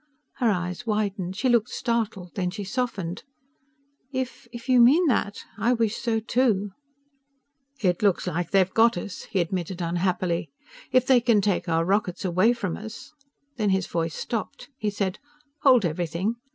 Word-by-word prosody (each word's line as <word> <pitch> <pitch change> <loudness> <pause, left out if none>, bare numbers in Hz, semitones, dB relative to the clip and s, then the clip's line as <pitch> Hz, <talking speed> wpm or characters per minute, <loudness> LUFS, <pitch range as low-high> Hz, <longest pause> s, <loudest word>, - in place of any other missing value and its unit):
Her 240 - +2
eyes 180 +3 -2
widened. 200 -4 -1
She 255 - 0
looked 240 -1 +3
startled. 220 -7 -2
Then 180 -2 -1
she 200 +3 -5
softened. 200 -4 -3 0.9
"If... 260 -2 -4 0.2
you 255 -2 +6
mean 290 +10 +6
that... 215 -7 0 0.2
I 235 +5 +3
wish 225 -2 0
so 230 -2 0
too." 220 -3 +1 1.1
"It 180 -2 +2
looks 200 -4 +2
like 175 -1 -2
they've 190 -1 +3
got 230 -2 +4
us," 190 +2 -6
he 195 - 0
admitted 175 +1 -2
unhappily. 175 -1 -1 0.4
"If 255 -1 +4
they 255 -2 +5
can 230 -3 +4
take 195 -3 0
our 165 0 +2
rockets 195 -1 0
away 185 +6 +3
from 200 -8 -3
us 220 +7 -9 0.2
" 285 0 -46
Then 215 -3 +1
his 190 -2 +1
voice 165 -1 -2
stopped. 230 +4 -4
He 215 -6 -2
said, 200 -2 -2 0.4
"Hold 255 -7 +5
everything!" 175 +6 -1
205 Hz, 160 wpm, -25 LUFS, 180-235 Hz, 1.1 s, you